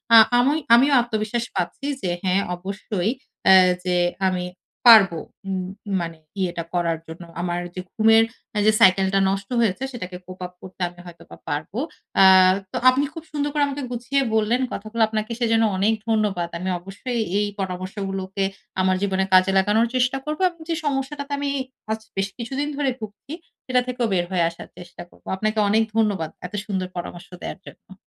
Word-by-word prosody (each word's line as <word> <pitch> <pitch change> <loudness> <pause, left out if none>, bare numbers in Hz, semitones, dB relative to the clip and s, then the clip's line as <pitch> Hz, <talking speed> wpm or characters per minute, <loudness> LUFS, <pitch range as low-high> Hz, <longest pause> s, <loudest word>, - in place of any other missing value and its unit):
আ - - +11 0.2
আমি 255 +4 +4 0.2
আমিও 275 +4 +4
আত্মবিশ্বাস 230 0 -2
পাচ্ছি 180 +8 -3 0.2
যে 185 - -1
হ্যাঁ 190 +1 +2
অবশ্যই 195 +2 -3 0.4
এ - - +9 0.3
যে 180 -1 0 0.3
আমি 180 -1 -2 0.5
পারবো 195 -6 +3 0.3
উম 185 -1 -2 0.3
মানে 165 -1 -5 0.2
ইয়েটা 175 -2 -1
করার 170 -2 0
জন্য। 160 +2 -9 0.2
আমার 175 0 -1 0.2
যে 185 - -3
ঘুমের 225 0 +5 0.3
এ - - +3
যে - - +7
সাইকেল 190 +1 +6
টা 195 - +4
নষ্ট 195 +1 -3
হয়েছে 230 +2 +1
সেটাকে 185 -7 -6
cope 185 +1 -11
up 180 - -9
করতে 185 0 -12
আমি 175 0 -19
হয়তোবা 170 -1 -13
পারব। 150 +2 -3 0.5
আ - - +9 0.5
তো - - -1
আপনি 260 +2 +2
খুব 325 -1 -8
সুন্দর 290 -1 -1
করে 295 -1 +2
আমাকে 280 0 -4
গুছিয়ে 250 +3 0
বললেন। 220 +3 +2
কথাগুলো 215 +3 -4
আপনাকে 215 +1 -3
সেজন্য 225 -2 +3
অনেক 205 +4 +3 0.2
ধন্যবাদ। 205 -6 0
আমি 185 +2 -3
অবশ্যই 200 +7 -4 0.2
এই 205 - +1
পরামর্শগুলোকে 190 +1 -3 0.4
আমার 185 0 +2
জীবনে 190 -1 +1
কাজে 185 +1 +6
লাগানোর 210 +4 +3
চেষ্টা 255 +1 +2
করব। 305 0 -3
এবং 340 -1 -19
যে 330 - +1
সমস্যাটাতে 285 +1 -2
আমি 285 0 -1 0.4
আজ 220 - -1 0.2
বেশ 195 0 0
কিছুদিন 265 +4 -3
ধরে 285 -2 +1
ভুগছি 215 +6 -9 0.3
সেটা 255 -1 +2
থেকেও 250 -1 -1
বের 175 -2 +1
হয়ে 180 -2 +2
আসার 170 - -11
চেষ্টা 175 0 -10
করব। - - -23
আপনাকে 215 +2 -1
অনেক 220 +2 +4
ধন্যবাদ। 205 -8 +1 0.2
এত 180 - -8
সুন্দর 190 -3 -2
পরামর্শ 175 0 -7
দেয়ার - - -6
জন্য। 190 - -14
200 Hz, 175 wpm, -23 LUFS, 185-235 Hz, 0.5 s, আ